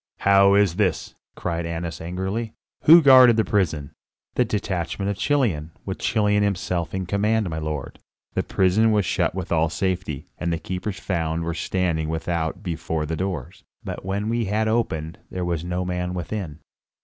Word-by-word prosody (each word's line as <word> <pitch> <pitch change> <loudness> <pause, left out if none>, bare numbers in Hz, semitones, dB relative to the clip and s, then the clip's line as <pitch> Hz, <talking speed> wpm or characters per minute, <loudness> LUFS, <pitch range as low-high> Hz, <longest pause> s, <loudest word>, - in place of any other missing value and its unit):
"How 100 0 +6
is 100 -4 +3
this?" 95 -7 0 0.2
cried 85 -1 -2
Annas 85 -2 -4
angrily. 95 +7 -3 0.3
"Who 165 +2 +9
guarded 130 -4 +8
the 110 - +3
prison?" 80 -9 0 0.4
"The 125 - +3
detachment 100 -3 -2
of 100 - -5
Chilion, 95 - 0
with 95 - -4
Chilion 105 -2 +2
himself 90 -4 -1
in 95 -1 -2
command, 105 +1 +1
my 80 - -3
lord. 75 -3 -5 0.3
The - - +1
prison 100 +4 +2
was 105 -3 +2
shut - - 0
with 95 -2 -5
all 80 -1 +2
safety, 90 -5 -2
and 85 -1 -1
the 85 - 0
keepers 95 +3 -5
found 85 -3 -2
we 85 - -2
standing 80 -2 -1
without 80 +3 -2
before 80 -3 -2
the 80 +2 -3
doors; 90 -1 -4 0.2
but - - -6
when 100 +3 -2
we 115 0 0
had 105 +2 0
opened, 85 -9 -1
there 90 -1 -3
was 85 -2 -2
no 90 +1 -2
man 90 0 -2
within." 85 -3 -5
90 Hz, 170 wpm, -23 LUFS, 85-105 Hz, 0.4 s, Who